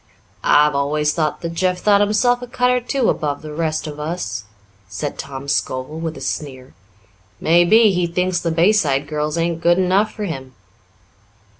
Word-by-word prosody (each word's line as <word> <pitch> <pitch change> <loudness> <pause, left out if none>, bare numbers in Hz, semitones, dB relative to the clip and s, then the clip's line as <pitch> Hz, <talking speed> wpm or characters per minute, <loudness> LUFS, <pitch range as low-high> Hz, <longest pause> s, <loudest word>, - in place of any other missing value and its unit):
"I've 150 0 +4
always 150 +2 0
thought 155 -3 -1
that 170 0 -4
Jeff 180 +1 0
thought 205 +1 +3
himself 245 +4 +2
a 245 - -7
cut 250 0 +1
or 250 0 +1
two 250 0 -1
above 145 -1 -1
the 155 -1 -7
rest 155 0 -2
of 150 -1 -7
us," 150 - -4 0.4
said 100 0 -5
Tom 140 0 -7
Scovel 130 +2 -2
with 165 -1 -4
a - - -10
sneer. 130 -3 -5 0.7
"Maybe 175 +7 +5
he 180 -2 0
thinks 180 +1 0
the 170 - -2
Bayside 165 -5 +2
girls 150 +1 -2
ain't 165 0 -1
good 175 +1 +4
enough 190 +3 +2
for 215 - -6
him." 130 -7 -7
165 Hz, 170 wpm, -19 LUFS, 150-185 Hz, 0.7 s, Maybe